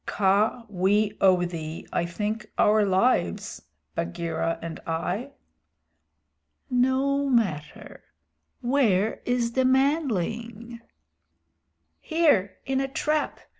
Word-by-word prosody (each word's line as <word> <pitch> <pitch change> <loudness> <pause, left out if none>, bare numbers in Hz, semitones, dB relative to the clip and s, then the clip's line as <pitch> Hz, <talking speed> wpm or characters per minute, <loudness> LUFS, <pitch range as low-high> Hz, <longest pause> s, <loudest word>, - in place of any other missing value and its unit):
Kaa, 210 +4 +1
we 205 +2 +1
owe 185 -2 +4
thee, 160 -2 -6
I 170 - 0
think, 210 +5 -3
our 215 0 +4
lives 190 - +1 0.3
Bagheera 165 - -2
and 165 0 -7
I." 180 +11 -3 1.4
"No 265 +3 +2
matter. 195 - -2 0.6
Where 225 -6 +1
is 245 -1 0
the 260 +2 +1
manling?" 235 - 0 1.2
"Here, 310 - +2
in 270 0 0
a 270 - -1
trap. 300 +3 -1
215 Hz, 95 wpm, -26 LUFS, 180-260 Hz, 1.4 s, owe